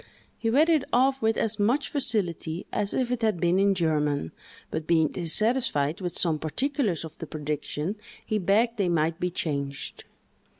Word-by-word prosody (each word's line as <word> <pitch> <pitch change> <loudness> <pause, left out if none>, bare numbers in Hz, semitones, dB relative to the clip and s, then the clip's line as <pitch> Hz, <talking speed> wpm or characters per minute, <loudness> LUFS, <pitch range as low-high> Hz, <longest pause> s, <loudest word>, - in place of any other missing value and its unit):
He 225 - -2
read 290 +8 +4
it 315 -4 +3
off 265 +2 +3
with 220 0 +2
as 220 -1 -1
much 245 +8 +1
facility 185 - -1
as 205 -1 0
if 250 -2 0
it 250 -1 -1
had 215 -6 +1
been 175 +2 +2
in 200 0 +3
German, 150 - 0 0.4
but 155 - -4
being 160 -3 +3
dissatisfied 175 - +1
with 180 -2 -3
some 160 -3 +1
particulars 220 - -1
of 160 0 -10
the 160 - -6
prediction, 150 +5 -3 0.3
he 215 - 0
begged 220 +5 +2
they 195 -4 +1
might 165 -1 +1
be 180 - 0
changed. 140 -5 -4
185 Hz, 170 wpm, -26 LUFS, 160-225 Hz, 0.4 s, read